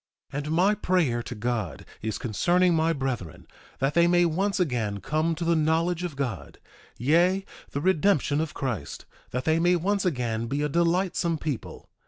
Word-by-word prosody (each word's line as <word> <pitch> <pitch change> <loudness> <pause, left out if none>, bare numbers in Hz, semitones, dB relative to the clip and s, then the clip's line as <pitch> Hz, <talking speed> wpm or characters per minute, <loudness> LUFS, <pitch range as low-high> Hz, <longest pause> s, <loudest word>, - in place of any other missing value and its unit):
1:8 - - -2
And 150 +1 -4
my 190 +5 +4
prayer 180 - +1
to 125 - -7
God 115 -4 -3 0.2
is 110 -1 -2
concerning 175 - +2
my 160 0 +2
brethren, 130 - -4 0.3
that 135 +2 0
they 170 +1 +5
may 175 0 +4
once 195 +5 0
again 120 - -1
come 155 +7 0
to 170 +1 -4
the 170 0 +3
knowledge 165 +2 +1
of 175 -5 -4
God, 120 - -4 0.4
yea, 175 - +3 0.2
the 140 - -3
redemption 160 -4 +2
of 160 -1 -4
Christ; 110 - -4 0.2
that 125 +1 -3
they 160 +1 +3
may 175 +1 +4
once 195 +4 0
again 120 - -1
be 140 +4 -1
a 150 - 0
delightsome 170 +1 +1
people. 150 -5 -5
155 Hz, 175 wpm, -26 LUFS, 125-175 Hz, 0.4 s, they